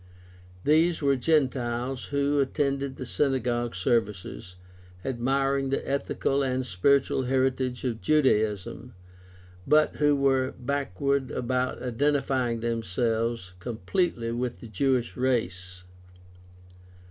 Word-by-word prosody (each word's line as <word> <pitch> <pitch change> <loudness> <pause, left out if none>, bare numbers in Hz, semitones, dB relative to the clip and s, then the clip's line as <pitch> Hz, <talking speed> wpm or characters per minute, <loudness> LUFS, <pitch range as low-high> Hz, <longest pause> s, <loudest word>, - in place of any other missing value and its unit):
These 160 +2 +3
were 140 -1 +4
Gentiles 130 -3 0
who 140 0 +1
attended 140 -1 0
the 130 - -6
synagogue 120 -4 0
services, 95 - -1 0.5
admiring 135 +2 0
the 135 - -2
ethical 140 0 0
and 130 -1 -1
spiritual 130 +6 +2
heritage 130 -1 0
of 115 -3 -2
Judaism, 110 -13 +1 0.7
but 150 +1 +4
who 145 -1 +3
were 135 -1 +1
backward 140 0 -1
about 125 +1 -2
identifying 130 -2 0
themselves 115 -2 -1
completely 120 - -1
with 120 +1 -3
the 120 - -10
Jewish 125 +3 0
race. 95 -8 -2
130 Hz, 100 wpm, -27 LUFS, 115-140 Hz, 0.7 s, were